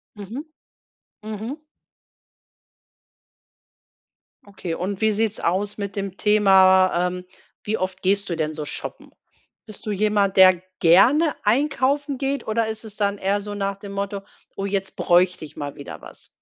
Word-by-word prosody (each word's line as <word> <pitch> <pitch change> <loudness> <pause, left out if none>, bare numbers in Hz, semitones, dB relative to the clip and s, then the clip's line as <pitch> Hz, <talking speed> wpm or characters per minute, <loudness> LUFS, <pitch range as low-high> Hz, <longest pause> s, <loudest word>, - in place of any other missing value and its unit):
Mhm. 220 - -7 0.8
Mhm. 220 +7 -6 2.9
Okay 190 -4 -6
und 190 +4 -4
wie 220 0 +3
sieht's 220 0 -1
aus 200 +4 -1
mit 200 -1 -5
dem 195 -1 -4
Thema, 190 -3 +5
ähm 180 0 -6 0.4
wie 215 +1 -1
oft 185 -1 -4
gehst 200 +1 +1
du 170 - -1
denn 155 -1 -2
so 155 - -4
shoppen? 145 - -6 0.5
Bist 215 -1 -10
du 215 - -2
jemand, 205 -1 +1
der 185 -2 +7 0.2
gerne 260 - +5
einkaufen 280 +4 +1
geht 275 -1 -2
oder 220 0 0
ist 220 +1 -5
es 210 -1 -9
dann 200 -1 0
eher 200 +2 0
so 205 0 -6
nach 200 -1 -2
dem 200 0 -10
Motto: 200 0 -3 0.3
„Oh, 195 - -3
jetzt 195 -1 -3
bräuchte 180 -1 +2
ich - - -15
mal 145 -1 -5
wieder 140 - -9
was?“ - - -11
200 Hz, 150 wpm, -23 LUFS, 185-215 Hz, 2.9 s, der